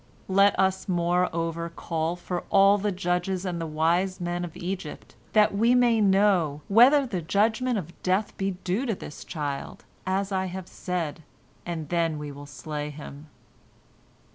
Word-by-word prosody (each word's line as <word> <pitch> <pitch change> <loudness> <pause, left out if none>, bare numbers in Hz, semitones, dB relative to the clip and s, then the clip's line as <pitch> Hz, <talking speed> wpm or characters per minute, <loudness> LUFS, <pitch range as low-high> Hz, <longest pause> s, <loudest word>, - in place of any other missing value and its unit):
Let 200 +1 +5
us, 190 0 +1
moreover, 170 -1 0
call 165 0 -2
for 175 0 -4
all 200 +1 +5
the 205 +1 0
judges 180 +1 -1
and 175 -2 -3
the 165 - -3
wise 170 +5 +1
men 175 0 -2
of 170 -2 -7
Egypt, 180 -3 -6 0.2
that 210 -2 +5
we 230 +5 +3
may 240 -3 +4
know 190 -7 +3
whether 260 +7 +6
the 190 -8 -3
judgment 220 +7 +1
of 175 -3 -7
death 190 +3 0
be 195 -2 -2
due 200 +9 -1
to 225 - 0
this 150 - -9
child, 145 -4 -5 0.2
as 195 +1 0
I 190 -1 0
have 185 0 -6
said, 170 -4 -4 0.5
and 165 -3 -4
then 165 -2 0
we 150 -1 -6
will 145 +1 -10
slay 150 +2 -5
him." 150 0 -10
180 Hz, 160 wpm, -26 LUFS, 165-195 Hz, 0.5 s, whether